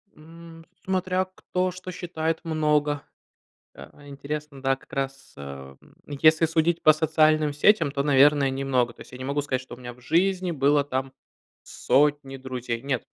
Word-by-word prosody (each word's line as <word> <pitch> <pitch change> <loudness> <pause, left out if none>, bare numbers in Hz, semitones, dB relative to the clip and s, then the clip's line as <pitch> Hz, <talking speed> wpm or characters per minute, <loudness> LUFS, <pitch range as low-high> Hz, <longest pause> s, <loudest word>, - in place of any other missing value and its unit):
М. 165 +1 -14 0.2
Смотря, 185 0 0
кто 185 0 -3
что 185 +1 -8
считает 165 -2 -3
много. 150 -2 0 0.7
Э, 145 -1 -14
интересно, 140 0 -7
да, 135 0 +1
как 135 - -24
раз, 135 -1 -5
э, 70 -1 -9
м, - - -22
если 155 +3 +3
судить 165 +1 0
по 155 - +7
социальным 155 -1 +2
сетям, 170 +3 +3
то, 140 - -1
наверное, 140 0 +4
немного. 130 -3 0
То - - -13
есть - - -19
я 125 - -9
не 130 - -7
могу 140 +1 -1
сказать, 130 -2 -2
что 125 - -11
у - - -16
меня 120 -1 -8
в 125 - -19
жизни 180 +6 +1
было 145 -1 +3
там 130 -1 -3 0.5
сотни 145 -1 +1
друзей. 125 -2 -5
Нет. 135 -3 -2
145 Hz, 170 wpm, -25 LUFS, 135-165 Hz, 0.7 s, по